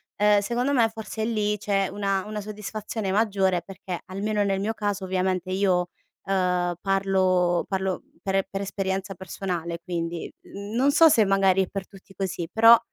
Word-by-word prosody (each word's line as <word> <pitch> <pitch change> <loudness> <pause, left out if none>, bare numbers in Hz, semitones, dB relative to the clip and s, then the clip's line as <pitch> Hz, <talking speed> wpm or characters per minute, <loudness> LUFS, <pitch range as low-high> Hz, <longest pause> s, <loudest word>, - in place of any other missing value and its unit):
ehm, 210 0 +4
secondo 240 +6 -1
me 230 -4 +4
forse 220 0 -5
lì 210 -2 0
c'è 195 -1 0
una 195 -2 -1
una 215 0 -4
soddisfazione 210 0 -4
maggiore 195 -4 +2
perché 185 -1 -7
almeno 205 +2 -1
nel 195 -1 0
mio 220 +2 -1
caso 205 -2 -2
ovviamente 185 -1 -1
io, 185 -2 +1 0.4
ehm, 180 -2 +1
parlo 185 -3 +2
parlo 190 -1 -1 0.2
per 195 0 -1
e 195 - +3
per 195 - -4
esperienza 195 0 -2
personale 175 -2 -4
quindi, 170 -1 -4
mhmm, 200 +2 -8
non 270 +4 +4
so 325 +3 +7
se 225 -6 +5
magari 195 -1 +3
è - - -5
per 195 0 -6
tutti 195 0 -16
così 185 -3 -3
però, 230 +1 +8
195 Hz, 165 wpm, -25 LUFS, 185-210 Hz, 0.4 s, però